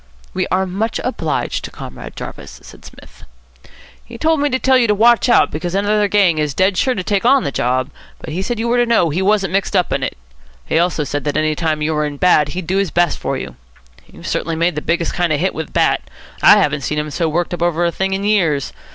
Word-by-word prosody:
"We - - -1
are 190 +1 0
much 200 +5 -2
obliged 165 - -2
to - - -6
Comrade - - -10
Jarvis," - - -9
said - - -14
Psmith. - - -15 0.8
"He - - -11
told 320 -1 +1
me 290 0 +1
to 260 - 0
tell 265 0 +2
you 250 -2 +4
to 210 - +2
watch 235 +3 +4
out, - - +4
because 175 +4 -4
another 205 +1 +1
gang 195 -6 +2
is 150 -2 -1
dead 190 +1 +2
sure 255 +6 +1
to 185 - -3
take 200 0 0
on 265 +1 +4
the 140 - -2
job. 130 0 -1 0.3
But 155 - -9
he 180 - -2
said 235 +5 -3
you 225 +2 -2
were 240 +1 +2
to 240 - +2
know 220 -9 +2
he 175 +6 -1
wasn't 195 -2 +1
mixed 195 +1 0
up 180 -2 +1
in 135 - -1
it. 130 - -3 0.5
He 160 - +1
also 170 -3 0
said 145 -1 -3
that 145 - -1
any 155 0 +1
time 155 -1 -1
you 160 +1 0
were 150 0 0
in 145 -1 -7
bad, 150 -3 +3
he'd 185 - -4
do 190 +4 -1
his 195 -2 +1
best 175 +1 +1
for - - -2
you. - - -8 0.5
You've - - -13
certainly 165 0 -2
made 170 +2 +1
the 150 - -4
biggest 170 +1 -1
kind 175 -2 0
of 150 - +1
hit 190 +4 0
with 160 -1 -6
Bat. - - +2 0.4
I - - +7
haven't 150 0 +1
seen 150 +3 -3
him 150 0 -3
so 165 +1 -1
worked 175 +3 -1
up 175 - -5
over 175 0 +1
a 170 - +1
thing 190 +2 -2
in 195 +1 -2
years. 175 -10 +1
175 Hz, 255 wpm, -17 LUFS, 155-205 Hz, 0.8 s, I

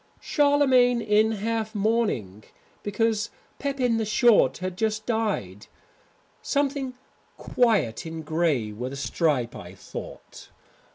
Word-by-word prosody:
"Charlemagne 265 -5 +3
in 215 0 +2
half 220 +1 -2
mourning, 200 - -1 0.4
because 215 +1 0 0.3
Pepin 265 -4 0
the 225 - 0
Short 215 - +4
had 185 0 -4
just 215 +1 -1
died. 205 - -2 0.7
Something 280 -2 -1 0.4
quiet 215 - +1
in 160 0 -6
grey, 155 -8 0
with 125 +5 -5
a - - -5
stripe 140 -4 0
I 90 +2 -10
thought. - - -10
215 Hz, 110 wpm, -25 LUFS, 150-235 Hz, 0.7 s, Short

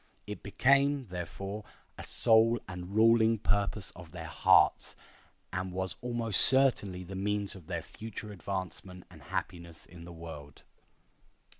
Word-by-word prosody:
It 105 -3 -7
became, 140 +3 +2
therefore, 95 +4 -5 0.3
a - - -9
sole 115 +1 +3
and 90 +1 -7
ruling 115 0 +5
purpose 100 -1 -1
of 85 -3 -12
their - - -7
hearts, - - +3 0.6
and 95 0 -2
was 95 +1 -3
almost 120 -4 +1
certainly 120 -9 +3
the 95 +2 -9
means 100 +1 -1
of 90 -5 -13
their - - -3
future 110 -1 -8
advancement 95 -1 -6
and - - -14
happiness 85 -2 -5
in 85 0 -13
the 85 - -10
world. 80 -4 -10
100 Hz, 135 wpm, -31 LUFS, 90-110 Hz, 0.6 s, ruling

